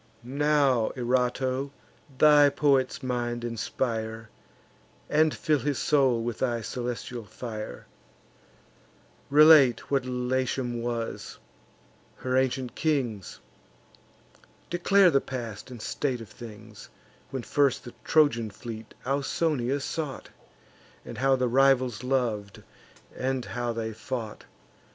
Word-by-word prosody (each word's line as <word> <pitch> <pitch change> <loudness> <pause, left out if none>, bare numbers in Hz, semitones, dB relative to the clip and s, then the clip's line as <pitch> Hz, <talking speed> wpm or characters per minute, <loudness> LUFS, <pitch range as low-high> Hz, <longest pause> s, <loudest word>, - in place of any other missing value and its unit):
Now, 140 -2 +2
Erato, 130 +2 0 0.5
thy 150 0 +7
poet's 140 0 +1
mind 120 -1 -2
inspire, 115 -1 -3 0.8
And 155 +1 +4
fill 150 -1 0
his 145 0 -1
soul 130 -6 +2
with 120 -2 -4
thy 120 -3 0
celestial 120 +1 -5
fire! 110 - -7 1.4
Relate 145 -5 +6
what 135 -2 +2
Latium 125 -1 -1
was; 115 -1 -4 0.8
her 130 0 -2
ancient 130 -1 0
kings; 125 - -2 1.3
Declare 180 +1 +4
the 140 - +3
past 115 -4 -6
and 125 - -8
present - - -5
state 130 -4 -1
of 110 - -10
things, 110 -2 -12 0.4
When 130 -2 -4
first 140 0 +1
the 120 - -10
Trojan 130 -8 +3
fleet 110 +1 -9
Ausonia 140 0 0
sought, 140 -1 -5 0.8
And - - -8
how 135 +1 +4
the 130 -1 0
rivals 130 -2 +3
lov'd, 120 -6 -1 0.5
and 130 -1 -2
how 120 +1 -3
they 115 -1 -4
fought. 115 -2 -6
125 Hz, 110 wpm, -27 LUFS, 115-140 Hz, 1.4 s, thy